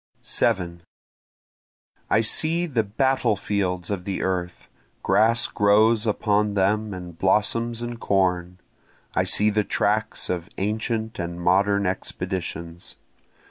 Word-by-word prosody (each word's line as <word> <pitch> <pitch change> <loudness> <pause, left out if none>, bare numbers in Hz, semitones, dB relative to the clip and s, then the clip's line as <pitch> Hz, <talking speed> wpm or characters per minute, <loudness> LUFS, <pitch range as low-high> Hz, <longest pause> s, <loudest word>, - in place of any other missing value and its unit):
7 90 -6 0 1.3
I 110 - +4
see 165 +9 +1
the 130 -9 0
battle 120 +2 +1
fields 95 -2 -2
of 95 -3 -3
the 95 0 -3
earth, 90 -1 -3 0.4
grass 115 +2 +3
grows 110 +2 +3
upon 105 -1 +1
them 105 +2 +1
and 90 -3 -8
blossoms 115 +4 +1
and 120 -1 -5
corn, 90 -3 0 0.6
I - - +1
see 105 +1 +3
the 105 0 +1
tracks 105 +1 -1
of 90 +1 -3
ancient 110 +2 -2
and 85 0 -4
modern 100 +3 +2
expeditions. 90 -2 -4
100 Hz, 115 wpm, -24 LUFS, 90-110 Hz, 1.3 s, I